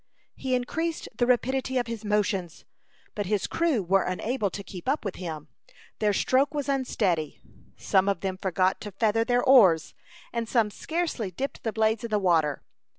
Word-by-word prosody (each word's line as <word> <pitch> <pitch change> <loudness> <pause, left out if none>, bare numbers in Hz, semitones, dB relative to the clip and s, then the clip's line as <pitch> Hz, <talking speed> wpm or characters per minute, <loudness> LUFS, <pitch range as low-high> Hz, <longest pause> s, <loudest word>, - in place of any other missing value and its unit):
He 260 -1 -1
increased 320 +7 -2
the 240 - +1
rapidity 260 +1 +1
of 245 - +1
his 230 -2 -6
motions, 205 -5 -1 0.5
but 205 -3 -3
his 205 -1 0
crew 320 - +1
were 190 +2 +3
unable 210 +4 -1
to 200 +2 -7
keep 190 +5 -6
up 280 -4 0
with 195 - -4
him. 160 -5 -6 0.5
Their 210 -1 +2
stroke 265 +8 +2
was 290 -1 -2
unsteady; 205 - 0 0.4
some 190 +1 +2
of 195 -4 -1
them 190 -1 -2
forgot 185 0 +1
to 210 - -6
feather 220 +3 +1
their 245 +1 +1
oars, 195 - +5 0.4
and 230 -1 -2
some 225 -4 +2
scarcely 320 - -2
dipped 265 +10 -5
the 225 - -1
blades 220 +1 +1
in 235 - -4
the 215 - +2
water. 165 -7 +1
215 Hz, 175 wpm, -27 LUFS, 190-255 Hz, 0.5 s, oars